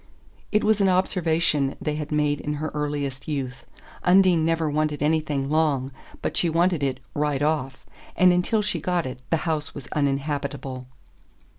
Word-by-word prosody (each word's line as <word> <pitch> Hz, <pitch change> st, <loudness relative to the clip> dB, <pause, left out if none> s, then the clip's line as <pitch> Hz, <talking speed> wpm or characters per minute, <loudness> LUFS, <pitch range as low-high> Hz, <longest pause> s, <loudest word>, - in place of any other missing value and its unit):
It 210 Hz, -, +2 dB
was 215 Hz, -1 st, +3 dB
an 195 Hz, -, +4 dB
observation 165 Hz, -6 st, +1 dB
they 150 Hz, -, -2 dB
had 150 Hz, 0 st, -5 dB
made 150 Hz, -1 st, +1 dB
in 150 Hz, 0 st, -2 dB
her 155 Hz, +2 st, -3 dB
earliest 145 Hz, -3 st, -3 dB
youth 135 Hz, -3 st, -4 dB, 0.4 s
Undine 180 Hz, -2 st, +5 dB
never 165 Hz, 0 st, +1 dB
wanted 150 Hz, -1 st, 0 dB
anything 150 Hz, -3 st, 0 dB
long, 145 Hz, -3 st, +1 dB, 0.3 s
but -, -, -2 dB
she 170 Hz, -, +1 dB
wanted 170 Hz, 0 st, +2 dB
it 135 Hz, -2 st, -1 dB
"right 145 Hz, -1 st, 0 dB
off." 145 Hz, -4 st, -1 dB, 0.3 s
And 180 Hz, -1 st, +5 dB
until 210 Hz, +5 st, +1 dB
she 195 Hz, -6 st, -1 dB
got 175 Hz, 0 st, 0 dB
it 125 Hz, -1 st, -6 dB
the 165 Hz, -, +3 dB
house 155 Hz, -3 st, -2 dB
was 140 Hz, -, -7 dB
uninhabitable. 140 Hz, -2 st, -2 dB
150 Hz, 160 wpm, -24 LUFS, 140-165 Hz, 0.4 s, Undine